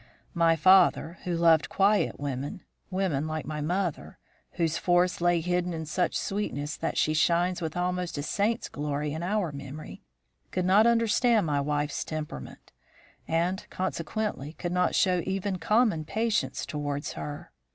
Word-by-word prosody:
"My 165 -2 +4
father, 180 0 +4
who 175 -2 -1
loved 165 -4 +4
quiet 200 +1 +2
women 140 +3 -4 0.3
women 185 -6 -1
like 155 0 -3
my 150 -1 -4
mother, 175 +1 -2 0.4
whose 165 -2 0
force 175 0 +2
lay 175 -1 +3
hidden 180 +1 -1
in 160 0 -4
such 170 +3 0
sweetness 150 -8 -3
that 165 - -3
she 155 - +2
shines 175 +3 +2
with 160 0 -3
almost 180 -2 -1
a 145 - -2
saint's 215 +8 0
glory 145 0 -3
in 160 - -4
our 185 -2 0
memory 140 +2 -8 0.5
could 180 -1 -1
not 205 +5 +5
understand 230 -1 +3
my 145 -2 +1
wife's 145 +1 -1
temperament; 150 - -7 0.6
and, 175 +4 0
consequently, 185 -3 -3
could 175 +1 -4
not 180 0 +1
show 185 -3 +3
even 190 0 -2
common 215 -7 +2
patience 220 +6 -1
towards 145 -2 -3
her. 145 0 -7
170 Hz, 150 wpm, -28 LUFS, 150-190 Hz, 0.6 s, not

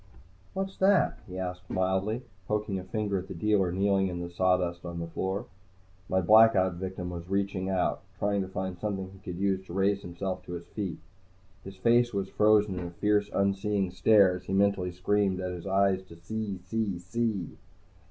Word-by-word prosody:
"What's 195 0 -3
that?" 195 0 +3
he 90 0 -7
asked 90 0 -5
mildly, 95 +6 0 0.2
poking 105 -2 -1
a - - -7
finger 100 0 -1
at 95 - -8
the 95 - -7
dealer 95 0 +2
kneeling 95 +1 +2
in 90 -1 -4
the 85 0 -5
sawdust 90 -1 +1
on 85 -1 -6
the 85 - -3
floor. 95 +4 -3 0.6
My 95 0 +2
Blackout 105 -1 +6
victim 90 0 -5
was 85 0 -7
reaching 95 -1 -1
out, 95 -2 0 0.2
trying 100 -1 +1
to 95 - -3
find 95 -1 -4
something 95 -2 -3
he 95 - -14
could 90 -1 -7
use 95 -1 +1
to - - -8
raise 100 +1 +2
himself 90 +1 -4
to 90 - -7
his 85 - -6
feet. 100 -6 -4 0.7
His 95 0 -9
face 120 +2 +3
was 95 -1 -1
frozen 105 -3 +3
in 90 - -4
a - - -6
fierce, 105 +4 +1
unseeing 100 -1 0
stare 100 0 +5
as 90 - -14
he 95 - -3
mentally 100 -2 +2
screamed 95 +1 +1
at 90 -1 -3
his 90 0 -7
eyes 95 0 +2
to 85 - -12
see, 100 +3 -4
see, 100 0 -1
see! 100 -1 -2
95 Hz, 190 wpm, -29 LUFS, 90-105 Hz, 0.7 s, Blackout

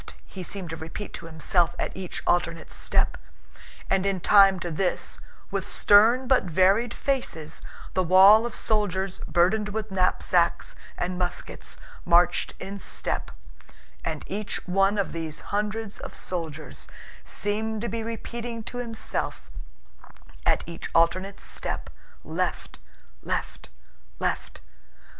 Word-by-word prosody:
he 190 - -9
seemed 180 -1 -5
to - - -3
repeat 165 +6 -7
to 165 - -7
himself 165 +2 +1
at - - -3
each 185 -2 -5
alternate 165 -2 0
step; - - +1 0.7
and 190 - +2
in 195 -1 0
time 195 0 +6
to 175 -1 -4
this, 180 +3 0 0.3
with - - -2
stern 230 +5 +5
but 260 -1 +4
varied 190 +7 +3
faces, 240 - -2 0.3
the 185 - +2
wall 190 +5 +8
of 240 -1 -4
soldiers 195 -3 0
burdened 200 +5 +2
with 215 0 -4
knapsacks 180 -2 +2 0.2
and 180 +1 -2
muskets 180 -1 -2 0.3
marched 175 0 +3
in 200 +1 -6
step, - - -1 0.7
and - - -3
each 205 0 -4
one 195 +3 +3
of 200 - 0
these 160 -2 -4
hundreds 210 0 -2
of - - -8
soldiers 160 -4 -5 0.4
seemed 215 +1 -1
to 235 - -2
be 230 +1 -3
repeating 230 +1 -5
to 245 - -6
himself 230 -2 -3 1.0
at - - +3
each 170 0 -7
alternate 185 +4 +2
step, - - -3 0.3
"Left... - - -3 0.4
left... - - -4 0.5
left..." - - -3
195 Hz, 125 wpm, -26 LUFS, 175-215 Hz, 1.0 s, wall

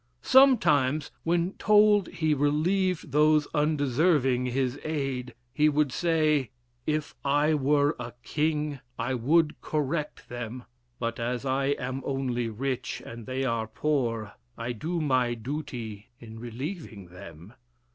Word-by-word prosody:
Sometimes, 155 - +4
when 170 +3 0
told 210 -2 +5
he 160 -3 0
relieved 160 +4 +1
those 150 +1 +4
undeserving 145 -3 +2
his 130 +1 -1
aid, 135 -5 -3 0.2
he 150 +1 +4
would 150 -2 +1
say, 155 -4 +1 0.4
"If 155 -1 -1
I 145 +2 +3
were 145 +1 +2
a 120 - -6
king 150 -2 -1 0.2
I 120 +2 -1
would 150 +6 +2
correct 150 0 -2
them, 120 0 -6 0.3
but 115 0 -3
as 120 +2 -2
I 135 +1 +1
am 130 +1 -4
only 125 -4 -1
rich 130 +3 -3
and 115 -1 -9
they 130 +1 -2
are 115 -4 -1
poor, 115 -4 -1 0.2
I 115 +1 -3
do 160 +9 -3
my 130 -5 +1
duty 115 -5 -6
in 115 -1 -10
relieving 120 - -7
them." 90 +1 -12
140 Hz, 125 wpm, -27 LUFS, 120-155 Hz, 0.4 s, told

